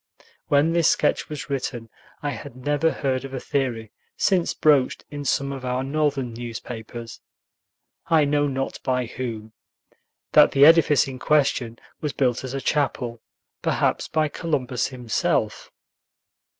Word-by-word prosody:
When 145 +3 +3
this 170 -2 +3
sketch - - +1
was 150 -1 -6
written, 125 -4 -3 0.4
I 145 - -1
had 140 -3 -8
never 145 +5 +1
heard 130 -4 -1
of 135 0 -6
a - - -3
theory 120 -6 -2 0.3
since 185 -4 +2
broached 145 -4 +3
in 145 -1 -6
some 140 +1 0
of 135 -2 -6
our 125 +1 -1
Northern 140 -3 -1
newspapers, 115 0 -7 0.9
I 160 -3 +4
know 145 0 +2
not 135 -1 -3
by 125 -1 0
whom, 115 -3 -6 0.8
that - - +6
the 140 +1 +7
edifice 155 -3 +6
in 130 -1 -7
question 135 -6 +1 0.2
was 150 -3 -3
built 125 -3 0
as 130 +1 -5
a 135 - -3
chapel, 125 -6 -1 0.4
perhaps - - 0
by 155 -1 +1
Columbus 140 -6 -2
himself! 125 -4 -1
135 Hz, 140 wpm, -24 LUFS, 125-145 Hz, 0.9 s, the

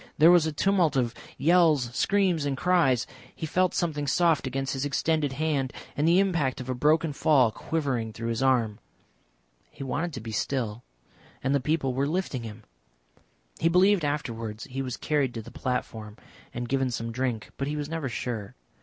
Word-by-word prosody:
There 160 +3 +7
was 175 -3 +5
a - - -1
tumult 175 -1 +2
of 120 -3 +1 0.2
yells, 155 -7 +3
screams, 190 -4 +2
and 140 -2 -1
cries. 145 -8 +3 0.3
He - - -4
felt 185 +3 +1
something 150 -4 -1
soft 160 +1 +2
against 135 +1 -2
his 135 0 -2
extended 145 0 0
hand, 140 -2 -1 0.2
and 150 +2 +1
the 170 +2 +5
impact 170 -10 +1
of 130 - -7
a - - +1
broken 150 +4 +2
fall 135 -5 +4
quivering 130 -6 -2
through 115 +1 -5
his 115 +1 -2
arm.... 120 -5 +2 0.9
He - - -9
wanted 150 +6 -2
to 125 - -5
be 110 0 -7
still 115 -1 -2 0.6
and 135 +1 +1
the 140 - +3
people 135 -1 0
were 135 +2 0
lifting 160 -6 -2
him. 110 -1 -9 1.0
He 165 - +3
believed 185 +1 +4
afterwards 115 -7 -3
he 135 0 -5
was 130 -2 -4
carried 140 -5 0
to 115 - -4
the - - -11
platform 110 -4 -4 0.3
and 120 0 -4
given 135 0 +1
some 115 -1 -4
drink, 125 -2 -3
but 135 - -2
he 150 - -2
was 145 -1 -3
never 160 -4 -3
sure. 115 -3 -4
135 Hz, 180 wpm, -27 LUFS, 125-160 Hz, 1.0 s, There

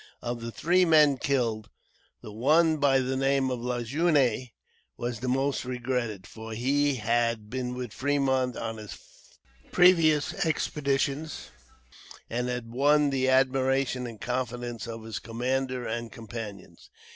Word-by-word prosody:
Of 120 -1 -3
the 115 0 -5
three 180 +8 +2
men 155 -5 +5
killed, 115 -7 -1 0.5
the 105 - -8
one 155 +8 +3
by 135 -2 +3
the 130 +1 -2
name 135 0 +1
of 125 -2 -3
Lajeunesse 125 +1 +1 0.5
was 120 -2 -3
the 130 - -4
most 135 +2 0
regretted, 125 -5 -3
for 110 0 -9
he 140 +5 +1
had 115 -1 0
been 125 -1 -3
with 125 -4 -6
Fremont 130 -2 0
on 115 -1 -4
his 105 -1 -8 0.7
previous 165 -5 +4
expeditions, 145 - -1 0.8
and 125 +2 -1
had 125 -2 -4
won 145 +3 +3
the 130 -1 +1
admiration 130 -1 +2
and 115 -3 -9
confidence 125 -1 -3
of 115 -1 -7
his 110 0 -5
commander 125 +2 -2
and 115 +1 -4
companions. 110 -4 -9
125 Hz, 135 wpm, -27 LUFS, 115-140 Hz, 0.8 s, men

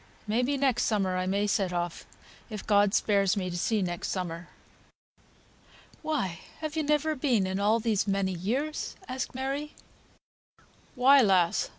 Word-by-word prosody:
May 220 +3 +1
be 280 +3 0
next 260 -3 +1
summer 195 -4 0
I 185 0 -1
may 200 +2 +1
set 200 -3 0
off, 175 -1 -3 0.4
if 215 -3 -7
God 205 -1 +3
spares 200 -1 +2
me 185 -2 -2
to - - -5
see 205 +3 0
next 175 -1 -3
summer." 175 -2 -4 1.5
"Why 195 - -2 0.2
have 310 -1 -4
you 315 - +1
never 300 +1 +1
been 255 -8 +1
in 190 +1 -2
all 215 +3 +3
these 215 -3 0
many 195 -1 0
years?" 250 - -3
asked 255 0 -4
Mary. 275 +3 -3 1.2
"Why, 270 +2 +6
lass! 185 -6 +2
210 Hz, 155 wpm, -28 LUFS, 190-265 Hz, 1.5 s, Why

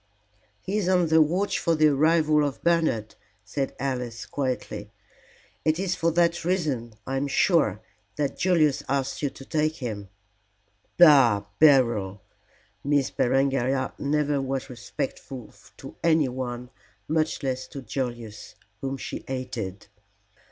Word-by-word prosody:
"He 205 +3 -1
is 185 -3 0
on 180 -3 +3
the 160 0 +6
watch 180 +7 +1
for 165 -2 +1
the 155 0 +5
arrival 155 +1 +3
of 145 -2 -3
Bernard," 160 -11 +1 0.3
said 135 +5 -3
Alice, 125 -3 -3
quietly. 125 -6 -3 0.7
"It 155 0 +2
is 185 0 -1
for 165 - +1
that 170 0 +2
reason, 150 - -1
I 135 +1 -2
am 140 +2 -1
sure, 155 - +2 0.3
that 145 -2 -1
Julius 155 -6 +2
asked 135 0 -1
you 145 - 0
to 135 - -13
take 155 +1 0
him." 105 -8 -5 0.9
"Bah! 135 -12 +6
Beryl!" 115 -10 +4 0.6
Miss 140 -2 +1
Berengaria 135 0 +1
never 145 0 0
was 135 -1 -3
respectful 125 0 -6 0.2
to - - -10
anyone, 130 -6 0 0.4
much 155 0 0
less 130 -1 -2
to 140 -3 -8
Julius, 120 -3 -5 0.2
whom 135 +2 -3
she - - -6
hated. 115 -7 -5
135 Hz, 130 wpm, -26 LUFS, 125-155 Hz, 0.9 s, the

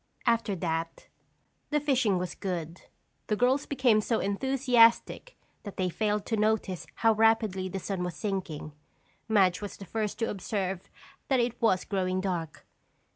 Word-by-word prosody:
After 230 -4 +2
that, 165 -2 -3 0.6
the 300 - +2
fishing 260 -9 +2
was 180 -1 -3
good. 175 -3 -5 0.5
The 215 - +1
girls 255 +5 +2
became 250 -6 +3
so 225 +1 0
enthusiastic 250 - +2 0.2
that 205 - -9
they 185 -1 0
failed 210 +2 -1
to 225 - -1
notice 210 -4 0 0.2
how 225 - +7
rapidly 215 -4 +2
the 195 - -4
sun 190 -1 -3
was 180 -1 -4
sinking. 185 -7 -4 0.6
Madge 195 -5 +3
was 205 - -6
the 195 - -9
first 215 +1 -3
to 225 0 -1
observe 195 -2 -3 0.4
that 265 -2 +2
it 240 0 -1
was 205 -5 +2
growing 185 -2 -1
dark. 175 -5 -4
205 Hz, 150 wpm, -29 LUFS, 185-230 Hz, 0.6 s, how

